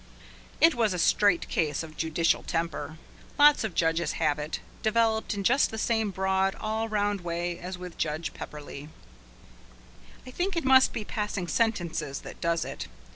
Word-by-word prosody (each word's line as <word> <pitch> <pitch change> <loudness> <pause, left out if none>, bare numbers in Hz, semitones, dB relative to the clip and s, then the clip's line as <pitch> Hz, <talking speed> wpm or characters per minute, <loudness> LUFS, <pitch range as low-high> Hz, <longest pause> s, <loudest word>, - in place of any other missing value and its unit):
It 330 0 +6
was 220 -5 +1
a - - -2
straight 180 +1 +3
case 155 -2 -1
of 155 -1 -10
judicial 165 +1 +1
temper. 165 -1 -3 0.4
Lots 295 -1 +6
of 215 -6 -4
judges 165 +1 +1
have 150 -2 0
it, 150 +1 -4 0.2
developed 220 -1 +1
in 200 - -3
just 260 +8 +4
the 220 - -6
same 220 -1 +1
broad, 190 0 0
all 220 +1 -2
round 205 -2 0
way 175 0 -3
as 180 +1 -6
with 180 -1 -9
Judge 155 +1 -2
Pepperleigh. 145 -1 -8 1.4
I 255 - -9
think 360 +6 -2
it 330 - -1
must 260 0 +6
be 215 - -4
passing 210 -4 -3
sentences 170 - -1
that - - -11
does 170 -1 0
it. - - -6
190 Hz, 165 wpm, -28 LUFS, 165-220 Hz, 1.4 s, It